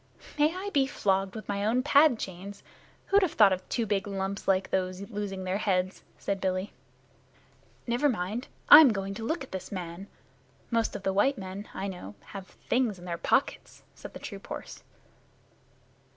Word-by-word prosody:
"May 300 +2 +5
I 395 +2 -4
be 275 -5 +3
flogged 195 -5 0
with 215 - -7
my 200 0 -2
own 235 +4 +2
pad 285 -3 +5
chains! 190 +1 -7 0.4
Who'd 400 +1 +4
have 370 -5 +1
thought 205 -3 +6
of 185 0 -6
two 235 - 0
big 200 -1 -1
lumps 195 0 -4
like 190 -1 +2
those 185 +1 -2
losing 200 -3 -4
their 185 +2 -1
heads?" 185 -2 0 0.2
said 200 -1 -3
Billy. 185 +1 -1 1.1
"Never 245 +5 +2
mind. 220 +2 -3 0.2
I'm 300 -2 +11
going 195 -1 -3
to 225 +3 -7
look 320 +6 -2
at 265 - -12
this 190 -1 -6
man. 180 0 -6 0.6
Most 230 -1 +1
of - - -6
the 195 - 0
white 255 +8 +3
men, 195 +2 -7
I 195 - -3
know, 180 - -8 0.2
have 195 -2 -7
things 240 -5 -1
in 175 - -12
their 170 -1 -4
pockets," - - 0
said - - -11
the - - -7
troop - - -9
horse. - - -7
200 Hz, 180 wpm, -28 LUFS, 190-235 Hz, 1.1 s, I'm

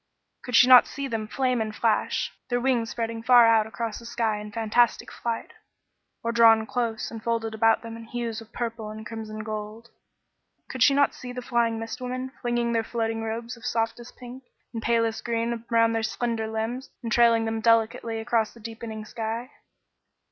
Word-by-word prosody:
Could 250 - -3
she 245 - +8
not 255 -1 +8
see 280 -1 -5
them 225 -4 -3
flame 255 0 0
and 215 -1 -3
flash, 225 -2 0 0.2
their 245 -1 +1
wings 245 -3 +1
spreading 230 -1 -3
far 245 0 +7
out 225 -1 +4
across 225 -1 -4
the 235 - -13
sky 225 -3 -1
in 210 0 -8
fantastic 230 +2 +1
flight, 235 -1 -4 0.7
or 230 - 0
drawn 225 -1 +6
close 230 -2 -2
and 225 -1 -7
folded 230 -1 -1
about 225 +1 +3
them 230 0 -7
in 230 0 -10
hues 230 -1 -4
of 225 - -15
purple 230 -2 -4
and 215 0 -8
crimson 220 -1 -7
and 215 0 -6
gold? 215 +2 -6 0.8
Could 260 - -6
she 275 +3 +6
not 285 0 +3
see 250 - -8
the 250 0 -6
flying 235 -2 +1
mist 225 +3 -6
women 255 +1 -4
flinging 240 -1 0
their 225 -1 +1
floating 225 -1 -2
robes 230 +2 -4
of 235 - -17
softest 235 0 -3
pink 250 +1 -10 0.3
and 225 - -4
palest 230 -1 +1
green 230 0 -2
around 230 0 +4
their 225 - 0
slender 225 0 -2
limbs, 225 +4 -3
and 230 - -4
trailing 230 -1 +4
them 225 0 -2
delicately 230 0 +2
across 225 -1 0
the - - -14
deepening 225 -1 -7
sky? 225 +4 -4
230 Hz, 190 wpm, -26 LUFS, 225-240 Hz, 0.8 s, she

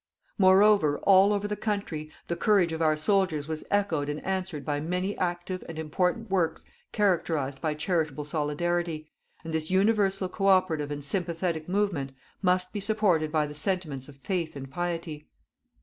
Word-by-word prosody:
"Moreover, 190 -5 +5
all 195 +1 +6
over 205 0 0
the 210 - -2
country, 200 -8 -3 0.2
the 170 - -1
courage 190 -4 +3
of 160 - -4
our 155 -1 +3
soldiers 160 -3 +1
was 160 -1 -4
echoed 170 -8 0
and 150 +1 -3
answered 185 -6 -3
by 145 -1 -1
many 180 +6 -2
active 175 +1 -2
and 165 - -7
important 180 +7 -1
works 180 -4 0 0.3
characterized 160 -9 0
by 155 -2 -1
charitable 155 -2 -1
solidarity, 155 +1 -2 0.3
and 165 0 -6
this 160 0 -2
universal 195 0 +2
co 195 +2 -2
operative 180 -6 +3
and 145 0 -5
sympathetic 165 +1 -2
movement 180 -9 0 0.3
must 180 -1 +1
be 210 - -2
supported 195 -7 +1
by 155 -1 +2
the 150 - -7
sentiments 150 -4 -2
of 140 - -14
faith 165 +3 -3
and 135 -1 -8
piety. 165 -2 -4
175 Hz, 160 wpm, -27 LUFS, 155-190 Hz, 0.3 s, all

